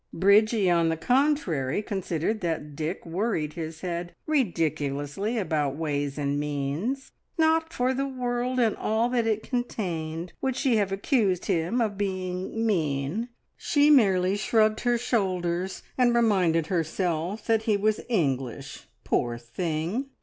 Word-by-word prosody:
Bridgie, 205 +2 +4
on 170 -2 +3
the 165 - -1
contrary, 215 - +1
considered 195 0 -2
that 160 -4 -3
Dick 160 +5 -4
worried 170 -3 -1
his 160 -1 -6
head 175 -1 -4
ridiculously 165 - -1
about 150 -9 0
ways 145 -2 -2
and 145 0 -1
means. 150 - -2 0.3
Not 320 0 +2
for 255 -4 0
the 275 +1 -1
world 250 -1 -2
and 225 -4 +3
all 225 +2 0
that 240 -2 +1
it 220 -1 0
contained 175 -9 -3
would 265 -2 0
she 255 -3 +2
have 200 -2 +1
accused 195 - +1
him 170 +8 0
of 205 -3 -1
being 185 +2 -2
mean: 165 - 0 0.3
she 295 0 +3
merely 195 -8 +4
shrugged 215 +1 +2
her 240 -1 +2
shoulders 185 -6 -1 0.2
and 240 -1 +4
reminded 185 -9 +3
herself 175 +3 -1
that 225 -1 +2
he 210 - +4
was 215 +1 +1
English, 135 - -2 0.2
poor 120 -1 0
thing! 165 - -3
190 Hz, 135 wpm, -26 LUFS, 160-230 Hz, 0.3 s, Bridgie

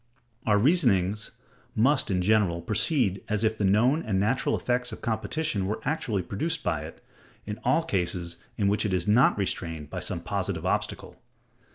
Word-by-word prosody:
Our 105 -1 +4
reasonings 105 - +2 0.5
must, 135 +5 +3
in 90 -2 +1
general, 95 -4 +2
proceed 110 - +1
as 105 0 0
if 110 0 +2
the 105 - -3
known 120 +11 +3
and 100 -8 -1
natural 110 +7 +1
effects 125 0 -1
of - - -7
competition 115 -1 -1
were 105 +2 -2
actually 115 - -1
produced 160 - -2
by 80 -3 -1
it, 80 - -12 0.4
in 105 0 -5
all 165 - +3
cases 85 - -2 0.2
in 100 - +1
which 105 +1 +2
it 100 -4 0
is 90 +1 -2
not 115 +3 +5
restrained 80 -6 -3
by - - -3
some - - -3
positive - - -3
obstacle. - - -2
105 Hz, 170 wpm, -27 LUFS, 95-125 Hz, 0.5 s, not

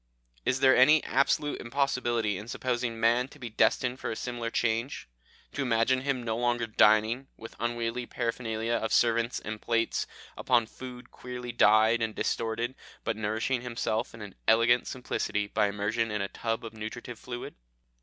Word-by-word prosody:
Is 130 +1 +1
there 130 -1 +6
any 150 +4 +6
absolute 140 +2 +1
impossibility 120 -4 0
in 105 +4 -7
supposing 120 -2 -2
man 120 +3 +3
to 145 - -16
be 120 -5 -7
destined 125 +3 +2
for - - -3
a - - -3
similar 120 -1 -4
change; 115 +2 -1 0.4
to 140 - -3
imagine 125 +1 +2
him 135 -2 -1
no 110 -1 -1
longer 120 -1 +1
dining, 110 +4 +3
with 115 - -10
unwieldy 120 +1 -2
paraphernalia 115 -1 -2
of 110 -1 -1
servants 115 0 +2
and 110 0 -6
plates, 115 -1 0 0.3
upon 120 -3 +2
food 125 +2 -10
queerly 125 -1 -7
dyed 110 0 +5
and 110 -1 -1
distorted, 115 +2 -1 0.3
but - - -1
nourishing 110 +4 -1
himself 115 -2 -2
in 105 -4 -9
elegant 115 +2 +4
simplicity 105 -4 -2
by 105 +1 +1
immersion 105 +3 -1
in 105 0 -2
a - - -2
tub 115 0 -3
of 115 - -7
nutritive 110 +2 -7
fluid? 120 -1 -7
115 Hz, 160 wpm, -29 LUFS, 110-125 Hz, 0.4 s, there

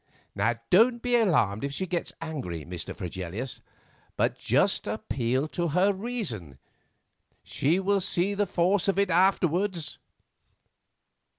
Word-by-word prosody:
Don't 235 +6 +5
be 245 -1 +2
alarmed 150 - +2
if 140 - -2
she 190 - -2
gets 175 -1 -2
angry, 130 - -5
Mr. 85 -1 -6
Fregelius, 95 +6 -5 0.6
but - - +1
just - - +2
appeal 130 +3 -1
to 175 +1 -1
her 180 +6 +3
reason; 190 - -4 0.9
she 160 +7 +1
will 195 +1 +1
see 185 +1 0
the 205 0 0
force 180 +3 +1
of 195 - +1
it 200 -2 +2
afterwards." 180 -1 +1
175 Hz, 120 wpm, -27 LUFS, 125-195 Hz, 0.9 s, Don't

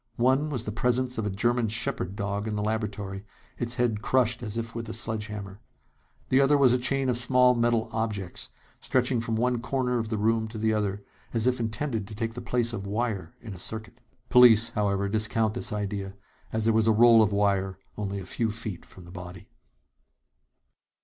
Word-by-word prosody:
One 130 +5 +2
was 125 -6 -3
the 105 - -4
presence 125 +2 0
of 105 - -1
a - - -1
German 120 +4 +1
shepherd 110 -3 -1
dog 100 0 -3
in 110 - -2
the 105 - -2
laboratory, 105 -2 -3 0.4
its 120 0 -1
head 115 -4 0
crushed 125 0 +2
as 110 -2 -5
if 115 0 -4
with 115 -1 -5
a - - -5
sledgehammer. 105 -3 -5 0.7
The 130 +1 +4
other 140 +1 +4
was 130 -3 +5
a 125 - +2
chain 135 +1 +1
of 125 -2 +2
small 125 0 +5
metal 120 -1 +1
objects 105 -5 -3 0.3
stretching 125 -2 +1
from 115 -1 -2
one 120 +1 0
corner 125 -1 -1
of 110 -1 -3
the 110 - -1
room 110 +1 +1
to 110 +1 -8
the 110 0 +1
other, 100 -1 -2 0.3
as 115 0 +2
if 125 0 +2
intended 110 -1 -2
to 105 - -8
take 115 +1 -3
the 120 - -7
place 120 -1 0
of 100 -3 -5
wire 110 0 -3
in 115 -4 -8
a 90 - -10
circuit. 110 +5 -5 0.3
Police, 115 -2 +7
however, 100 -3 0
discount 110 +1 0
this - - -4
idea, 100 -2 -4 0.4
as 110 -1 -1
there 115 - +4
was 110 0 +2
a - - +6
roll 115 +1 +7
of 105 -1 +3
wire 100 -2 +1 0.2
only 100 -1 -4
a 95 - -8
few 115 +3 -1
feet 110 -5 -5
from 90 - -14
the 85 - -13
body. 90 -1 -10
110 Hz, 200 wpm, -27 LUFS, 105-120 Hz, 0.7 s, Police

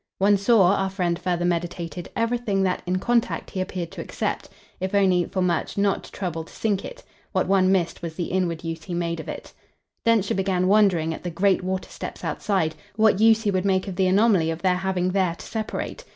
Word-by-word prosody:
One 200 +2 +4
saw, 200 -2 +4
our 195 0 0
friend 180 -3 -1
further 175 -1 -1
meditated, 175 0 -3
everything 230 -4 0
that, 185 -1 0
in 180 +1 +1
contact, 235 +4 0
he 185 - -2
appeared 180 -2 -4
to - - -6
accept - - -3 0.3
if 190 +2 -2
only, 185 -3 +3
for 185 - -2
much, 175 +2 -1
not 200 -1 +1
to - - -14
trouble 170 -4 -4
to - - -16
sink 205 -3 -1
it: - - -9 0.3
what - - +2
one 190 -1 +4
missed 180 -3 0
was 165 -2 -5
the 175 -1 -3
inward 175 -3 -1
use 165 -1 -5
he 180 - -4
made 170 -1 -2
of - - -7
it. - - -8 0.5
Densher 225 -4 +2
began 185 -1 +1
wondering, 185 -6 +3
at - - -8
the 175 - -4
great 190 +2 +2
water 185 0 -3
steps - - -7
outside, 185 -6 0 0.2
what 215 -2 +4
use 225 0 +5
he 205 - +1
would 185 -1 0
make 190 0 +1
of 190 - -4
the 190 0 +2
anomaly 190 -4 +3
of 165 +1 -4
their 180 -1 +3
having 185 -1 0
there 185 -3 +1
to - - -11
separate. 220 - -4
185 Hz, 215 wpm, -24 LUFS, 175-200 Hz, 0.5 s, use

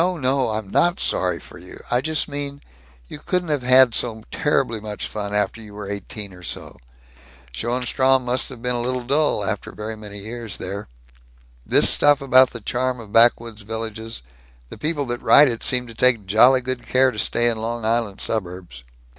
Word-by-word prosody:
No! 140 -8 0
I'm 110 -2 -4
not 175 +1 +2
sorry 90 -2 -1
for - - -14
you! - - -12
I 120 +1 +2
just 155 +1 -1
mean, 145 -1 -6 0.5
you - - -9
couldn't 180 +2 -2
have 145 -3 0
had 125 -1 +6
so 110 -2 -3
terribly 130 -6 0
much 105 -1 -6
fun, 105 -1 -5
after 105 +2 -1
you 105 -2 -12
were 105 -1 -7
eighteen 100 0 -7
or 90 - -14
so. 90 - -6 0.7
Schoenstrom 130 - +1
must 125 +3 0
have 125 -3 -11
been 125 0 0
a 120 - -1
little 125 +1 -2
dull, 140 -5 +1
after 105 -1 -4
very 110 +1 -6
many 105 -1 -10
years 110 +1 -7
there. 100 +1 -6 0.8
This - - +5
stuff 145 -1 +4
about 130 -2 +5
the 115 - -9
charm 125 +3 -2
of 110 -3 -12
backwoods 115 -1 +3
villages 110 - -6 0.5
the - - -10
people 150 -2 -2
that 120 0 -4
write 145 +1 +7
it 115 -3 -3
seem 125 -1 +1
to 115 - -11
take 115 -2 +2
jolly 125 +6 +5
good 130 0 -5
care 130 0 +3
to 105 - -7
stay 120 +2 +1
in 115 -2 0
Long 115 0 -4
Island 110 -3 -1
suburbs!" 90 - -4
120 Hz, 190 wpm, -22 LUFS, 105-130 Hz, 0.8 s, write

